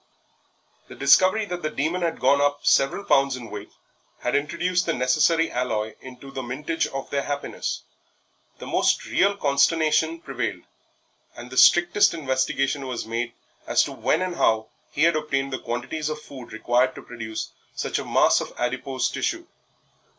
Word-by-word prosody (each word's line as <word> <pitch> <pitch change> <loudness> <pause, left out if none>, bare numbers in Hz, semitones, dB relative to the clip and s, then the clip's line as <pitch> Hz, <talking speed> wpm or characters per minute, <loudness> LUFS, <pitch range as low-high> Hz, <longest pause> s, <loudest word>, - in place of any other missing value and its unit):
The - - -11
discovery 185 +10 +4
that 180 -3 -5
the 155 - -1
Demon 155 +5 -1
had 170 -2 -1
gone 140 +2 +4
up 145 0 0
several 135 +9 +3
pounds 135 -6 +3
in 120 -3 -9
weight 105 0 -7 0.5
had 125 - -1
introduced 175 +5 0
the 165 - +2
necessary 155 +6 +2
alloy 110 -3 -2
into 130 +1 -11
the 135 - -4
mintage 145 +6 -2
of 135 0 -6
their 140 - 0
happiness; 145 0 -4 0.7
the - - -9
most - - +1
real 200 +1 +2
consternation 155 +2 +2
prevailed, 130 -6 -4 0.7
and 120 +1 -10
the 130 - -7
strictest 175 +4 +5
investigation 135 -1 -1
was 125 -4 -4
made 115 +1 -3 0.3
as - - +4
to - - -5
when 165 - 0
and 180 -2 -4
how 110 -5 +2 0.2
he 145 - 0
had 170 -1 +4
obtained 135 -3 -1
the 130 - -2
quantities 130 +6 -3
of 155 0 -4
food 135 -5 -11
required 120 +3 +1
to - - -10
produce 110 -2 -6 0.2
such - - -2
a - - -4
mass - - +3
of - - -6
adipose 130 +2 -1
tissue. - - -2
140 Hz, 165 wpm, -24 LUFS, 125-160 Hz, 0.7 s, strictest